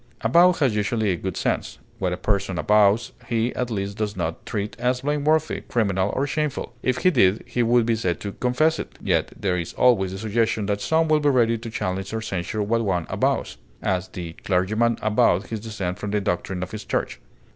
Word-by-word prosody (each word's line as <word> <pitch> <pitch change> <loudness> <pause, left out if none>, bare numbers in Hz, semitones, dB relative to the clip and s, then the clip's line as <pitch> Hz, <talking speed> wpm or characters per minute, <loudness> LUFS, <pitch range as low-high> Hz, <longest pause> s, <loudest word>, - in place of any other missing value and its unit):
Avow 170 +11 +6
has 135 -10 +1
usually 105 0 +1
a - - +1
good 95 +2 -4
sense; - - -1 0.2
what 90 -2 0
a 90 - -2
person 100 -3 -1
avows 105 +3 +3 0.2
he 115 0 0
at 125 -1 -2
least 100 -2 -3
does 105 -1 -2
not 80 -2 -3
treat 105 -2 -3
as 125 0 0
blameworthy, 150 +2 +1
criminal, 100 -4 +1
or 135 - +1
shameful; 150 -3 -2
if 130 0 0
he 185 - +6
did, 95 - +3
he 120 - -1
would 120 0 +3
be 115 0 +2
said 90 -7 -1
to 100 - -4
confess 145 +9 +1
it; - - -7
yet - - 0
there 90 -3 0
is 85 - -5
always 100 -7 +3
the 95 - -5
suggestion 110 0 0
that 100 0 -1
some 160 +7 +2
will 155 -1 +4
be 145 -1 +2
ready 120 -4 +3
to 115 +1 -6
challenge 95 -1 -3
or 110 - -2
censure 95 +1 -2
what 115 +3 +1
one 90 -5 0
avows; - - 0 0.3
as, 90 -1 0
the 85 -2 -7
clergyman 110 +5 +1
avowed 105 -3 +3
his 110 - -3
dissent 100 -5 -4
from 105 - -4
the 105 +1 +1
doctrine 95 -1 -2
of 90 - -7
his 110 0 -6
church. - - -2
110 Hz, 210 wpm, -23 LUFS, 95-120 Hz, 0.3 s, Avow